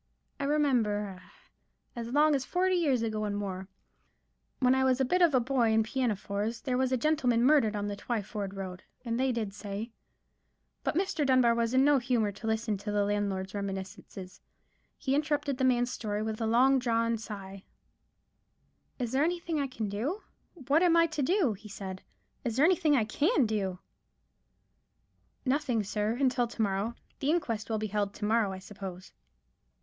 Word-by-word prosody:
I 280 - -1
remember—ah, 220 -10 +1 0.7
as 235 -1 -5
long 295 +4 +4
ago 290 - +3
as 265 - -4
forty 370 +5 +1
years 285 -10 +2
and 225 -1 -1 0.2
more—when 195 +6 -5
I 265 0 +2
was 260 -1 +3
a 265 - +3
bit 360 +8 +1
of 335 -6 +5
a - - +6
boy 245 -1 +1
in 220 0 +4
pinafores, 220 -2 -2
there 255 -2 -1
was 260 0 +1
a 260 - +2
gentleman 250 -4 +2
murdered 255 -6 +4
on 205 0 -2
the 205 0 -3
Twyford 205 -2 -4
road, 185 -2 -6 0.2
and 230 0 -1
they 260 0 +2
did 220 -5 -3
say——" 205 +2 -6 0.9
But - - -1
Mr. 380 -3 0
Dunbar 255 -3 +4
was 230 +1 0
in 265 +1 +5
no 290 -1 +5
humour 240 -4 +1
to 210 +3 -8
listen 220 -1 0
to 210 +1 -4
the 205 -1 +2
landlord's 200 -2 -1
reminiscences. 190 -1 -6 0.6
He 265 -2 -1
interrupted 290 -2 0
the - - +1
man's 245 -1 +2
story 210 -3 -3
with 220 0 -4
a 225 - +1
long 260 +4 +4
drawn 230 -2 +1
sigh,— 195 -3 -8 1.3
"Is 245 -3 -3
there 270 +3 +2
anything 335 -1 -1
I 280 - 0
can 230 -5 -4
do? 250 - -3 0.3
What 290 0 +1
am 345 -2 +5
I 335 - +6
to 320 -3 -3
do?" 325 - +2
he 210 +2 -12
said. 190 -2 -7 0.4
"Is 235 -3 -2
there 275 +4 +5
anything 330 -4 +3
I 230 -5 +2
can 290 - +2
do?" 200 -4 -1 1.7
"Nothing, 255 -5 +1
sir, 210 +2 -1
until 255 -3 +2
to 230 - -5
morrow. 200 +3 -1 0.2
The 280 - -1
inquest 230 - -1
will 220 - 0
be 215 - -2
held 205 -1 -2
to 210 - -4
morrow, 220 -2 +2
I 190 - -5
suppose." 190 -1 -9
235 Hz, 175 wpm, -30 LUFS, 205-275 Hz, 1.7 s, a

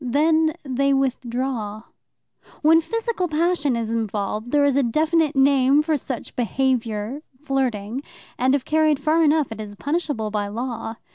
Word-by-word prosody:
Then 315 +5 +2
they 275 0 +1
withdraw. 245 -4 -2 0.8
When 325 +2 +6
physical 455 0 -2
passion 310 -4 +1
is 230 -1 -2
involved, 215 0 -2
there 290 +1 +3
is 280 -2 +2
a 280 - +4
definite 310 +4 +1
name 270 +1 +4
for 315 0 +1
such 260 -3 -5
behaviour 245 0 -1 0.2
flirting 260 -5 -2 0.3
and 260 +2 +2
if 275 -2 -2
carried 310 -2 +2
far 310 +3 +2
enough 305 -4 +2
it 220 -1 -6
is 205 -1 -8
punishable 285 -5 -2
by 205 -1 -1
law. 230 +1 -4
270 Hz, 145 wpm, -22 LUFS, 230-305 Hz, 0.8 s, When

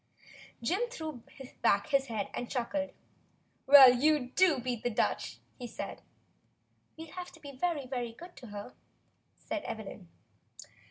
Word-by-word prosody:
Jim 390 - 0
threw 315 - -6 0.4
back 200 0 +3
his 275 -2 +2
head 220 -4 -3
and 245 - -4
chuckled. 285 +3 -2 0.8
"Well, 270 -2 +10
you 275 0 +2
do 370 -6 +5
beat 245 -2 -3
the 245 - 0
Dutch," 225 - -1 0.2
he 245 - -5
said. - - -7 1.0
"We'll 320 -1 -9
have 360 -1 -7
to 325 - -15
be 285 -2 -9
very, 290 +1 -1
very 245 -3 -4
good 350 +8 -12
to 255 -4 -10
her," 205 -1 -8 0.6
said 320 - -4
Evelyn. 200 - -7
270 Hz, 145 wpm, -31 LUFS, 240-315 Hz, 1.0 s, Well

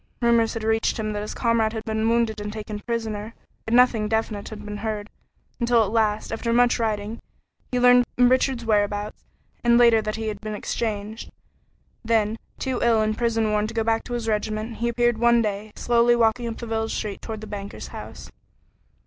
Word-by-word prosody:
Rumors 235 -2 +3
had 225 - -4
reached 225 0 +1
him 215 -1 -2
that 205 - -3
his 210 - -6
comrade 230 -2 +1
had 220 -1 -4
been 220 0 0
wounded 230 -2 +1
and 205 0 -4
taken 210 -1 -6
prisoner, 220 -1 -4 0.3
yet 225 - -1
nothing 240 -4 +4
definite 220 -2 -2
had 210 -1 -9
been 210 0 -5
heard, 210 -1 -4 0.5
until 235 -1 +3
at 205 - -3
last, 220 -2 0
after 230 +1 -2
much 245 +1 +3
writing, 215 0 -2 0.5
he 250 - +1
learned 245 0 +6
Richard's 250 0 +3
whereabouts, 205 -1 0 0.4
and 235 0 +5
later 235 -2 +6
that 215 0 -3
he 220 0 -3
had 205 -1 -6
been 215 -1 -4
exchanged. 215 0 -4 0.7
Then, 225 -1 +1 0.2
too 260 -2 -2
ill 230 -2 +4
and 215 0 0
prison 225 -2 0
worn 210 0 +1
to 230 - -8
go 225 - +1
back 225 0 +1
to 245 - -6
his 235 -2 -3
regiment, 215 +1 -2
he 235 - -1
appeared 240 -1 +1
one 235 0 +4
day, 210 0 -3
slowly 240 0 +3
walking 235 +1 +2
up 230 - -5
the 235 - -6
village 220 -1 -2
street 205 -2 -4
toward 220 -2 -6
the - - -7
banker's 200 -1 -7
house. - - -9
225 Hz, 195 wpm, -24 LUFS, 215-235 Hz, 0.7 s, learned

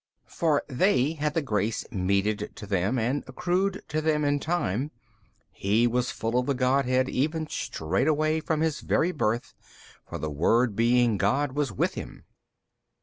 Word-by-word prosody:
For 155 -4 0
they 145 0 +2
had 150 -1 -2
the 165 - +1
grace 110 -3 -1
meted 100 +2 0
to 110 - -8
them 100 +4 0
and 125 +5 0
accruing 180 +8 0
to 155 - -1
them 155 -1 +1
in 145 0 +2
time, 145 - -1 0.6
He 105 +4 +1
was 125 +1 +1
full 115 +2 -1
of 125 - -2
the 140 - +1
Godhead 130 0 +2
even 155 +5 -1
straightway 155 - 0
from 155 0 -1
His 160 -2 0
very 170 +3 +1
Birth, 120 -7 -1 0.6
for - - -4
the 75 - -4
Word 110 - +2
being 120 -1 +3
God 130 +9 +1
was 140 -3 -1
with 95 - 0
Him. - - -8
130 Hz, 155 wpm, -27 LUFS, 110-150 Hz, 0.6 s, being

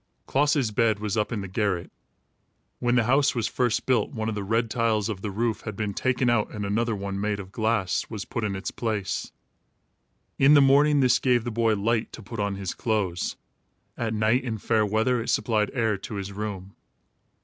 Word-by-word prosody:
Klaas's 140 -4 +2
bed 110 0 +2
was 105 -2 -2
up 105 +1 0
in 110 -4 -2
the 100 - -5
garret. 95 -2 -1 0.9
When 120 0 +1
the 125 - +4
house 135 +4 +3
was 115 -2 0
first 120 -3 0
built, 125 -5 +2
one 110 0 -3
of - - -2
the 105 -1 -3
red 115 +3 +1
tiles 115 -3 +1
of 100 -3 -4
the 105 - -3
roof 110 +2 -1
had 110 -3 -6
been 105 -1 -2
taken 125 +3 0
out 120 -3 +2
and 105 -1 -5
another 110 +3 0
one, 100 0 -4
made 105 -1 -1
of 95 -1 -9
glass, 110 -3 0
was 105 -3 -5
put 115 - -4
in 100 -2 -1
its 95 - -4
place. 110 -4 -3 1.1
In 140 +2 +7
the - - +8
morning, 140 +1 +5
this 125 -2 +4
gave 125 -3 +2
the 120 - -3
boy 115 -1 +2
light 110 +2 0
to 115 - -9
put 115 +2 -7
on 100 -1 -1
his 95 -2 -4
clothes. 100 -7 -1 0.6
At 110 -2 -2
night, 110 +4 +2
in 115 -4 -3
fair 110 0 +1
weather, 110 +4 +1
it 115 - -5
supplied 110 -3 +1
air 110 -4 +1
to 105 - -7
his 100 0 -4
room. 100 -2 -6
110 Hz, 205 wpm, -26 LUFS, 100-120 Hz, 1.1 s, the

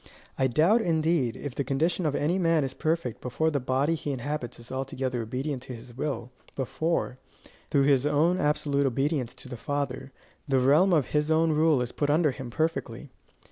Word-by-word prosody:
I 130 - +2
doubt, 165 - +3
indeed, 160 - +1
if 145 -3 -6
the 140 - -2
condition 155 +6 0
of 145 - -1
any 170 +6 +1
man 165 -4 +3
is 135 -1 -3
perfect 155 -5 -2
before 160 +6 0
the 145 - 0
body 135 +5 +1
he 150 -2 -3
inhabits 135 -1 -4
is 120 - -10
altogether 130 -2 -2
obedient 130 +4 -3
to 130 -1 -7
his 120 +1 -12
will 130 -3 -3 0.2
before, 140 0 -1 0.5
through 140 -2 +3
his 140 0 +3
own 160 +5 +2
absolute 145 -3 +1
obedience 135 0 -1
to - - -9
the 125 -2 -7
Father, 140 0 -3 0.4
the 135 -2 +2
realm 145 +9 +4
of 155 -7 +2
his 150 0 0
own 160 0 +3
rule 155 -4 +3
is 125 - -6
put 145 - -1
under 150 0 +3
him 130 -1 -7
perfectly. 145 -2 -2
140 Hz, 185 wpm, -27 LUFS, 130-155 Hz, 0.5 s, realm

